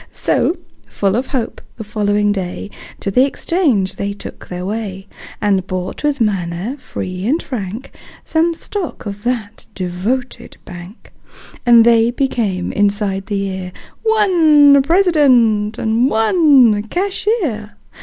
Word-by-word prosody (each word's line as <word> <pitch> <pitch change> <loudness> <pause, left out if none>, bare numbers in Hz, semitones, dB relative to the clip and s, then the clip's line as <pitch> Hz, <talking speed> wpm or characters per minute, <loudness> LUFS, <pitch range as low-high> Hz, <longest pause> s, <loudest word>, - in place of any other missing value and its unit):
So, 345 - 0 0.3
full 200 -1 -1
of 255 +3 -1
hope, 250 -5 -3 0.2
the 225 - -6
following 205 -1 0
day 195 +1 -4 0.3
To 195 - -2
the 250 +6 +4
exchange 265 - 0
they 200 0 -3
took 200 - -10
their 180 0 -6
way 200 -2 -5 0.3
And 195 -3 0
bought, 185 +6 -5
with 295 -1 0
manner 195 +1 -1
free 185 -6 -5
and 300 +7 +2
frank, 225 - -6 0.3
Some 330 +1 +1
stock 370 - -5
of 205 0 -7
that 225 -4 -3
devoted 195 +8 -4
bank; 175 +5 -12 0.5
And 235 -1 +7
they 230 -1 +4
became, 230 -8 -1
inside 200 -1 -1
the 205 -2 -2
year, 190 -2 -4 0.3
One 325 -10 +5
President 265 - +3
and 225 +4 +1
one 240 - +4
Cashier. 350 - -2
220 Hz, 125 wpm, -17 LUFS, 195-275 Hz, 0.5 s, And